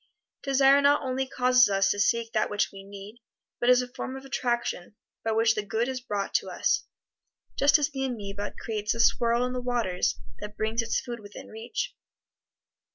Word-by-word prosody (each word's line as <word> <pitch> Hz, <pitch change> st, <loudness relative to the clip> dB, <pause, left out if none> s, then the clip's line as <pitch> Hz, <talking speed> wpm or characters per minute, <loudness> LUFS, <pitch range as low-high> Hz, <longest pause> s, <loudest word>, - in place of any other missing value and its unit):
Desire 275 Hz, 0 st, +4 dB
not 285 Hz, +1 st, +4 dB
only 260 Hz, 0 st, -1 dB
causes 250 Hz, -2 st, +4 dB
us 195 Hz, 0 st, +2 dB
to 205 Hz, -, -2 dB
seek 230 Hz, +2 st, +1 dB
that 215 Hz, -, +1 dB
which 205 Hz, 0 st, 0 dB
we 195 Hz, 0 st, -11 dB
need, 200 Hz, +3 st, -11 dB, 0.4 s
but 240 Hz, -, +2 dB
is 250 Hz, 0 st, +6 dB
a -, -, -7 dB
form 265 Hz, 0 st, -5 dB
of 265 Hz, -, -11 dB
attraction 240 Hz, -7 st, -2 dB, 0.3 s
by 225 Hz, -, 0 dB
which 225 Hz, 0 st, +3 dB
the 215 Hz, -, -2 dB
good 220 Hz, +3 st, -1 dB
is 260 Hz, -1 st, -3 dB
brought 205 Hz, -5 st, -3 dB
to -, -, 0 dB
us, -, -, 0 dB, 0.7 s
just 285 Hz, +2 st, +5 dB
as 295 Hz, 0 st, 0 dB
the 270 Hz, -1 st, -3 dB
ameba 205 Hz, -5 st, -4 dB
creates 215 Hz, 0 st, -2 dB
a -, -, -6 dB
swirl 235 Hz, +1 st, +3 dB
in 250 Hz, -, -3 dB
the 250 Hz, -, -3 dB
waters 235 Hz, -8 st, -1 dB, 0.2 s
that 210 Hz, 0 st, -8 dB
brings 220 Hz, +2 st, 0 dB
its 230 Hz, 0 st, 0 dB
food 240 Hz, -1 st, -6 dB
within 205 Hz, -1 st, -11 dB
reach. 220 Hz, +2 st, -5 dB
235 Hz, 190 wpm, -27 LUFS, 210-255 Hz, 0.7 s, is